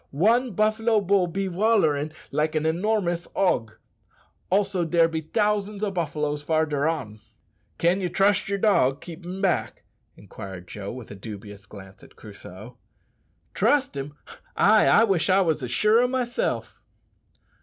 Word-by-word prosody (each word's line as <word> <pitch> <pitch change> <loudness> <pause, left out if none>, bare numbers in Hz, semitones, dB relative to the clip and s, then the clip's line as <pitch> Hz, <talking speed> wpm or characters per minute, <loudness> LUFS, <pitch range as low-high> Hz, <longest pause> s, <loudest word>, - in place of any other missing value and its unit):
One 230 - +2
buffalo 215 +2 +2
bull 195 -2 +2
be 195 +3 -3
wollerin' 175 -7 +1 0.2
like 155 +1 0
a 155 0 0
enormerous 175 0 -1
hog. 115 - +1 0.8
Also, 195 -1 +1
dere 165 0 +3
be 160 -1 -3
t'ousands 210 +3 -1
o' 205 - 0
buffaloes 150 -4 -2
farder 155 -1 0
on." 110 -10 -4 0.6
"Can 175 +3 +1
ye 180 - -1
trust 195 +2 +2
yer 200 - 0
dog 145 -10 +2
keepin' 175 +2 -8
back?" 190 -3 -1 0.3
inquired 95 -2 -10
Joe, 100 0 -7
with 125 -3 -10
a - - -8
dubious 100 -1 -10
glance 95 -2 -13
at - - -18
Crusoe. 105 +3 -12 0.7
"Trust 285 - +1
him! 140 +2 -6 0.4
Ay, 215 +2 +5
I 225 - +6
wish 195 -6 +1
I 190 +1 +4
was 160 -5 0
as 125 - -4
sure 215 - +3
o' 250 - +2
myself." 250 -1 -3
170 Hz, 145 wpm, -24 LUFS, 140-205 Hz, 0.8 s, I